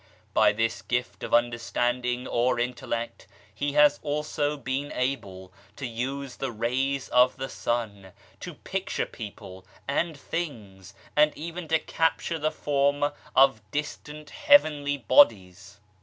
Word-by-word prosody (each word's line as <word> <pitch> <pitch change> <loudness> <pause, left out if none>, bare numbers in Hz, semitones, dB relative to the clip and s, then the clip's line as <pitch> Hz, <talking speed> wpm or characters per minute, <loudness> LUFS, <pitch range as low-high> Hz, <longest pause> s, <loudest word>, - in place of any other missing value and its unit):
By - - +5
this 115 +2 -1
gift 125 0 -3
of - - -6
understanding 120 +1 0
or 120 0 +1
intellect, 120 -1 -4 0.3
he 145 0 -2
has 145 0 +5
also 150 0 -2
been 135 +2 -3
able 95 -8 -3 0.2
to 135 - -6
use 130 +3 -4
the 135 -2 -3
rays 130 +4 -1
of 125 +1 +4
the 135 0 -4
sun 105 -7 -3 0.3
to - - -8
picture - - -3
people 95 -3 -10 0.2
and 155 +3 -1
things, 105 - -6 0.2
and 150 0 +4
even 170 +2 -6
to 160 - +3
capture 165 +1 -1
the 155 +1 +1
form 145 0 +1 0.2
of 135 -4 +5
distant 150 +1 -5
heavenly 155 - +4
bodies. 100 - +3
135 Hz, 125 wpm, -26 LUFS, 120-145 Hz, 0.3 s, By